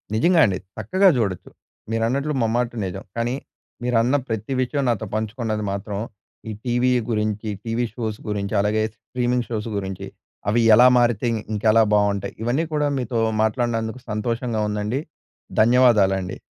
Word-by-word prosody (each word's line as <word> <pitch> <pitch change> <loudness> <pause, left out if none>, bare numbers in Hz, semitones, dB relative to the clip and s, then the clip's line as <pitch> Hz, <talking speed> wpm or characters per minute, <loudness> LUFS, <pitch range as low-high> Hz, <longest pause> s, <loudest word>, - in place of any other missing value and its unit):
నిజంగా 170 +10 +4
అండి. 95 -2 0 0.2
చక్కగా 185 - +3
చూడొచ్చు. 100 -6 -2 0.4
మీరన్నట్లు 125 +7 0
ముమ్మాటి 120 +2 0
నిజం. 95 +1 -5
కానీ. 120 +2 0 0.5
మీరన్న 125 +2 +2
ప్రతి 110 +3 -3
విషయం 140 +2 -1
నాతో 115 -2 -1
పంచుకున్నది 110 0 -2
మాత్రం. 100 0 -4 0.5
ఈ - - -3
టీవీ 120 +1 +2 0.2
గురించి. 105 0 -1 0.2
టీవీ 115 +2 0
షోస్ 110 -3 -4
గురించి. 100 -1 -2
అలాగే 110 +1 +1
స్ట్రీమింగ్ 125 0 -2
షోస్ 110 0 -3
గురించి. 95 -2 -5 0.4
అవి 115 +2 +3
ఎలా 125 +3 +8
మారితే 120 -1 +2 0.3
ఇంకెలా 110 +1 +4
బావుంటాయి? 100 -1 +1
ఇవన్నీ 125 +7 +1
కూడా 150 -1 +1
మీతో 120 -1 -2 0.2
మాట్లాడినందుకు 115 +1 -1
సంతోషంగా 115 +1 -1
ఉందండి? 105 +6 -2 0.6
ధన్యవాదాలండి. 105 -6 +3
115 Hz, 130 wpm, -22 LUFS, 105-125 Hz, 0.6 s, ఎలా